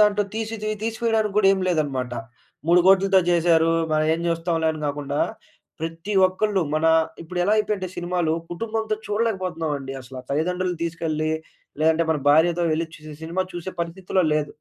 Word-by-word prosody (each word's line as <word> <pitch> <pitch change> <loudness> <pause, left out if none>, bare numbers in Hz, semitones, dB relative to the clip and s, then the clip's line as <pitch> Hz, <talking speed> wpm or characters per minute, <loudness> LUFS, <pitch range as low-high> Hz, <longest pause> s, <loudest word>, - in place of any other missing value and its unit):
దాంటో 210 0 +4
తీసి 225 0 -3
తి 215 - 0
తీసివెయడానికి 225 -2 0
గూడా 200 -2 +5
ఏం 190 - 0
లేదనమాట. 135 -7 -1 0.5
3 175 +1 +6
కోట్లతో 195 0 +5
చేశారు, 165 -1 +4 0.2
మన 155 - +3
ఏం 165 - -4
జూస్తాంలే 165 -1 0
అని 155 - -7
గాకుండా, 145 0 -2 0.6
ప్రతి 165 +5 -4
ఒక్కళ్ళు 195 +1 0
మనా 160 +1 +3 0.3
ఇప్పుడెలా 180 +4 0
అయిపోయంటే 205 -3 -1
సినిమాలు, 175 -2 0 0.2
కుటుంబంతో 220 +3 -2
చూడలేకపోతున్నావండి 180 -10 -2
అసల. 130 0 -11
తల్లిదండ్రులని 180 +3 -1
తీసుకెళ్ళి, 160 -2 -2 0.5
లేదంటే 160 +1 +3
మన 155 - +1
భార్యతో 170 +3 +4
వెళ్లి 165 +2 0
చూసే, 155 0 -10
సినిమా 185 +3 -1
చూసే 175 +2 -5
పరిస్థితిలో 180 +1 -1
లేదు. 150 -1 +1
175 Hz, 145 wpm, -23 LUFS, 160-195 Hz, 0.6 s, 3